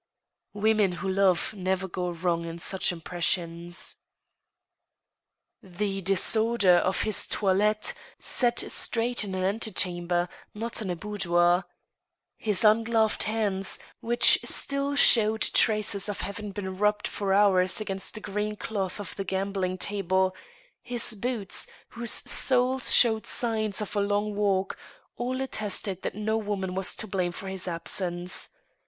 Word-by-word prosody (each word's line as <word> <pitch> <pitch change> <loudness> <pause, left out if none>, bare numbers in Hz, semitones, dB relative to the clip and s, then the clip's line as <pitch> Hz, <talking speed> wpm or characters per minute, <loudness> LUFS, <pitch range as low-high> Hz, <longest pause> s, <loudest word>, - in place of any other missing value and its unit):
Women 210 -2 +2
who 180 +2 -5
love 190 0 +1
never 190 0 -2
go 180 0 -3
wrong 170 0 -1
in 165 0 -6
such 185 +2 +1
impressions. 170 0 -2 1.6
The 195 +1 -4
disorder 195 +1 +3
of 185 +2 0
his 215 -2 0
toilet 210 +2 +1 0.2
(set 240 -2 +1
straight 235 0 +1
in 195 -2 -5
an 185 - -2
antechamber, 180 -4 0 0.3
not 230 +2 -2
in 200 - -4
a 175 - -1
boudoir), 175 -2 +1 0.7
his 210 -3 0
ungloved 220 0 +3
hands, 205 -3 -1 0.2
which 240 +1 +5
still 280 0 -1
showed 220 -5 +5
traces 210 -2 +3
of 205 - -4
hav 200 +3 -5
ing 210 0 -6
been 190 -1 -6
rubbed 210 0 +1
for 200 -2 -3
hours 190 -2 +3
against 195 -3 -5
the 215 - -7
green 210 +1 -3
cloth 200 -3 -4
of 205 - -8
the 195 - -2
gambling 190 -1 -2
table, 190 -1 0 0.5
his 240 -1 -1
boots, 220 -1 -2 0.2
whose 235 -1 -3
soles 255 0 +3
showed 220 -3 +5
signs 220 -3 0
of 210 - -6
a 205 - +2
long 205 +1 0
walk, 195 -2 0 0.4
jdl 255 +2 -2
attested 205 -6 -3
that - - -4
no 215 +1 -1
woman 200 -4 -3
was 190 0 -2
to - - -3
blame 185 -3 -2
for 195 +3 -8
his 190 -1 -4
absence. 175 +1 -3
200 Hz, 135 wpm, -27 LUFS, 185-215 Hz, 1.6 s, which